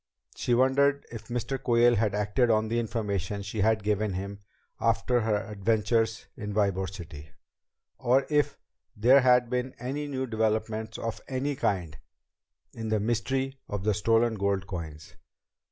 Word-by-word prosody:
She 120 Hz, -, +1 dB
wondered 140 Hz, +3 st, +3 dB
if 115 Hz, -2 st, -8 dB
Mr. 125 Hz, +2 st, -3 dB
Quayle 120 Hz, -1 st, +4 dB
had 105 Hz, -1 st, +1 dB
acted 105 Hz, +4 st, +1 dB
on 110 Hz, -1 st, +2 dB
the 115 Hz, +1 st, +1 dB
information 105 Hz, -4 st, -2 dB
she 100 Hz, +2 st, -3 dB
had 110 Hz, 0 st, +2 dB
given 105 Hz, -1 st, 0 dB
him 100 Hz, +2 st, -5 dB, 0.4 s
after 125 Hz, -1 st, +2 dB
her 110 Hz, -2 st, 0 dB
adventures 110 Hz, +1 st, 0 dB
in 105 Hz, -1 st, -5 dB
Ybor 95 Hz, -3 st, +1 dB
City 80 Hz, -5 st, -9 dB, 0.7 s
or 130 Hz, +3 st, +3 dB
if 145 Hz, -1 st, +1 dB, 0.4 s
there 125 Hz, +6 st, +6 dB
had 125 Hz, -1 st, +4 dB
been 125 Hz, +1 st, -2 dB
any 140 Hz, +5 st, -4 dB
new 130 Hz, -2 st, -2 dB
developments 110 Hz, -1 st, -1 dB
of 115 Hz, -1 st, -4 dB
any 135 Hz, +2 st, -2 dB
kind 90 Hz, -, -1 dB, 0.7 s
in 110 Hz, -1 st, -5 dB
the 110 Hz, -1 st, +2 dB
mystery 130 Hz, +5 st, -1 dB
of 100 Hz, -2 st, -3 dB
the 105 Hz, 0 st, +2 dB
stolen 115 Hz, +3 st, +2 dB
gold 100 Hz, -2 st, 0 dB
coins. 80 Hz, -6 st, -7 dB
110 Hz, 150 wpm, -28 LUFS, 100-125 Hz, 0.7 s, there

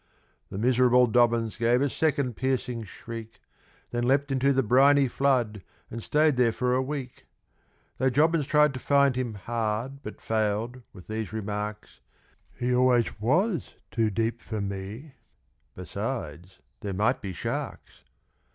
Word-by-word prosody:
The -, -, -6 dB
miserable 125 Hz, +2 st, +4 dB
Dobbins 115 Hz, -1 st, +2 dB
gave 120 Hz, +2 st, +3 dB
a -, -, +2 dB
second 140 Hz, -4 st, 0 dB
piercing 125 Hz, -3 st, -2 dB
shriek, 115 Hz, +3 st, -9 dB, 0.5 s
Then 120 Hz, 0 st, -1 dB
leaped 140 Hz, +2 st, +2 dB
into 135 Hz, +1 st, +2 dB
the 135 Hz, -1 st, +2 dB
briny 135 Hz, +4 st, +5 dB
flood, 120 Hz, -5 st, +1 dB, 0.3 s
and 115 Hz, -, -5 dB
stayed 150 Hz, +2 st, +2 dB
there 120 Hz, -2 st, +4 dB
for 125 Hz, +2 st, 0 dB
a 130 Hz, -, +2 dB
week; 130 Hz, -2 st, -6 dB, 0.7 s
Though 130 Hz, +1 st, +3 dB
Jobbins 150 Hz, +2 st, +2 dB
tried 150 Hz, -1 st, +4 dB
to 130 Hz, -, -5 dB
find 140 Hz, -1 st, +3 dB
him 125 Hz, -4 st, -2 dB
hard, 115 Hz, +5 st, -3 dB
but 105 Hz, -, -8 dB
failed, 110 Hz, +3 st, -1 dB
with 90 Hz, -3 st, -13 dB
these 110 Hz, 0 st, -4 dB
remarks, 105 Hz, -, -5 dB, 0.6 s
"He 125 Hz, +1 st, 0 dB
always 125 Hz, -3 st, +2 dB
was 175 Hz, -, +1 dB, 0.2 s
too 115 Hz, -2 st, +1 dB
deep 115 Hz, +3 st, -1 dB
for 110 Hz, -2 st, -5 dB
me 100 Hz, +8 st, -5 dB, 0.6 s
besides, 90 Hz, +2 st, -5 dB, 0.2 s
there 100 Hz, -, -4 dB
might 110 Hz, +7 st, +1 dB
be 100 Hz, -, -5 dB
sharks." 85 Hz, -, -5 dB
120 Hz, 140 wpm, -27 LUFS, 110-135 Hz, 0.7 s, briny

